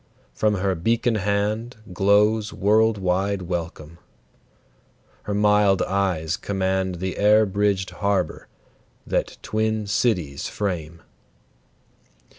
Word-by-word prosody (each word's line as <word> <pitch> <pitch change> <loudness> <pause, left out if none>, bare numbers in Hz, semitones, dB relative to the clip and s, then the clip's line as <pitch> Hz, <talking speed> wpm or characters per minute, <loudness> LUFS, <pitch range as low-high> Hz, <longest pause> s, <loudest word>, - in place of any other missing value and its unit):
From 105 - +1
her 95 0 0
beacon 115 +7 0
hand 105 +3 -1 0.2
Glows 105 +3 +3
world 110 +2 +2
wide 95 +1 -1
welcome; 85 -2 -5 1.3
her 105 - -2
mild 105 -2 +3
eyes 90 -4 -1
command 95 -2 -1
The 95 +2 -4
air 105 +1 +5
bridged 100 -1 0
harbor, 100 -4 -2 0.6
that - - -2
twin 110 0 -1
cities 95 - -1
frame. 85 -5 -4
100 Hz, 95 wpm, -23 LUFS, 90-105 Hz, 1.3 s, air